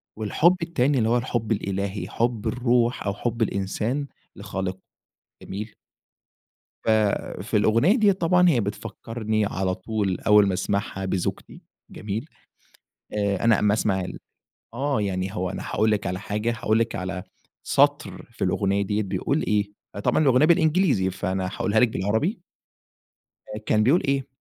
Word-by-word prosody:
والحب 110 - +3
التاني 145 -4 +1
اللي 110 -2 +2
هو 120 - +3
الحب 120 -2 -2
الإلهي، 100 -2 -2
حب 115 -2 -1
الروح 120 -1 +1
أو 100 - 0
حب 115 +3 -3
الإنسان 110 +7 -1 0.3
لخالقه 95 -1 -4 0.6
جميل؟ 105 +3 -7 1.1
ف - - -2 0.5
في 105 +2 0
الأغنية 115 - +4
ديّة 215 -5 +4
طبعًا 180 -1 +3
هي 135 -8 +3
بتفكرني 110 +1 -3
على 95 -2 -1
طول 100 -1 -2
أوّل 105 -1 +5
ما 95 - 0
أسمعها 95 +1 -2
بزوجتي، 95 -2 -3 0.3
جميل؟ 110 +8 -5 0.8
آآ، 100 -2 0
أنا 115 -2 +4
أما 105 0 +3
أسمع 100 -3 +1
ال 90 - -6 0.5
آه، 135 0 0
يعني 95 0 -2
هو 95 -2 -1
أنا 95 - -5
هاقول 110 0 +1
لِك 105 -2 0
على 90 0 -3
حاجة، 105 +3 -2
هاقول 110 +1 +2
لِك 115 0 -1
على 95 0 -4 0.4
سطر - - +1
في - - -5
الأغنية 100 0 +1
دي 105 +2 -1
بيقول 100 +10 -1
إيه، 105 -1 0 0.3
طبعًا - - +2
الأغنية 135 0 +5
بالإنجليزي 160 - +3
فأنا 95 0 -2
هاقولها 110 +2 +1
لِك 125 - +5
بالعربي. 110 - -1 1.2
كان 110 -1 +3
بيقول 145 +10 +4
إيه؟ 135 -1 0
110 Hz, 145 wpm, -24 LUFS, 100-125 Hz, 1.2 s, أوّل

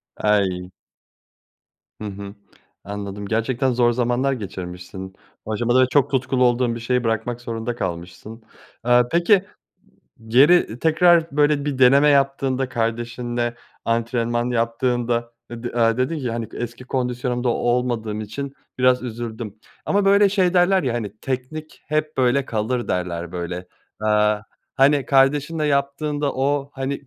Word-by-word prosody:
Ay! 95 -4 0 1.3
Hı - - -4
hı, 100 0 -8 0.5
anladım, 100 0 -6
gerçekten 120 +4 0
zor 120 0 +3
zamanlar 125 +3 +1
geçirmişsin. 95 -3 -7 0.3
Bu 110 - -5
aşamada 120 +3 +3
çok 140 0 +2
tutkulu 130 -1 +1
olduğun 120 -1 +2
bir - - -6
şeyi 125 +2 0
bırakmak 115 +1 -2
zorunda 115 0 -4
kalmışsın. 90 +4 -6 0.4
Aaa, 120 0 +4
peki 185 +3 +4 0.8
geri 130 +1 +4
tekrar, 165 +2 +4
böyle, 145 -1 +3
bir 145 -3 -2
deneme 140 +3 +6
yaptığında, 135 -2 +1
kardeşinle 120 0 -2 0.3
antrenman 120 +1 0
yaptığında 120 0 0 0.2
e 120 0 -8
d 120 - -3
aaa, 115 0 +2
dedin 150 +5 0
ki, 125 -4 -3
hani, 115 -2 -3
"Eski 120 +1 -6
kondisyonumda 125 -1 -1
olmadığım 120 -3 -1
için 135 +6 -6 0.2
biraz 125 0 +3
üzüldüm." 115 -3 -6 0.3
Ama, 200 0 +1
böyle, 200 +1 +5
şey 190 -2 +2
derler 185 +1 +4
ya, 125 -3 0
hani, 110 -3 -4
"Teknik 135 +4 -5
hep, 155 0 -2
böyle, 130 +1 +2
kalır." 120 +2 -2
derler, 85 -2 -3
böyle. 90 0 -5 0.3
Aaa, 105 -1 +2 0.3
hani, 140 0 +4
kardeşinle 145 +3 +2
yaptığında 145 +1 0
o, 140 +1 0
hani, 135 +1 -3
120 Hz, 130 wpm, -22 LUFS, 115-140 Hz, 1.3 s, deneme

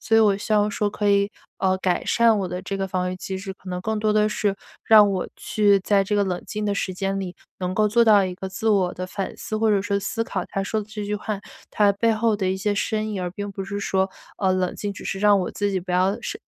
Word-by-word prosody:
所 225 - +2
以 - - +7
我 205 -2 +4
希 210 +2 -4
望 210 0 +3
说 205 0 0
可 205 0 -1
以， 200 0 +3 0.3
呃， 190 0 +2
改 180 -2 0
善 230 -2 +4
我 190 - -1
的 180 +1 -4
这 195 - -4
个 195 0 -2
防 180 -1 -1
御 185 - -5
机 190 +1 -5
制， 190 0 -6
可 185 - -14
能 180 0 -3
更 220 +2 -2
多 215 0 +1
地 215 0 +3
是， 205 -2 0 0.3
让 210 -2 +7
我 185 -2 -1
去 205 -2 +2
在 195 0 +2
这 210 - -1
个 205 - +3
冷 180 -2 -2
静 210 0 -4
的 205 -1 0
时 185 - -2
间 195 +1 -2
里， 185 -1 -5 0.2
能 185 0 -2
够 215 +1 +3
做 235 +2 +4
到 210 -3 +6
一 180 -1 -4
个 190 +1 -6
自 220 +3 -2
我 190 -4 +3
地 185 0 -5
反 195 +1 -4
思， 215 - -4
或 220 -1 +3
者 200 -2 +3
说 200 -1 0
思 225 +3 -2
考 190 -5 -3
他 195 - -3
说 215 +2 -1
的 205 - -8
这 215 -1 -5
句 210 - -1
话， 210 -1 -4 0.3
它 205 -1 +4
背 225 +3 +2
后 220 -1 +1
的 190 -2 -1
一 190 - 0
些 205 +2 0
深 215 +1 -1
意。 200 - -3
而 180 -1 -3
并 205 +2 -5
不 195 -1 -5
是 200 +1 -4
说， 190 -1 +1 0.3
呃， 190 -2 +2
冷 185 -1 0
静 205 -1 -3
只 - - -10
是 195 - -3
让 205 -1 +5
我 - - -2
自 205 -1 -1
己 190 -2 -1
不 180 +1 -8
要 185 +3 +2
生 415 - -5
200 Hz, 305 characters per minute, -23 LUFS, 190-210 Hz, 0.3 s, 以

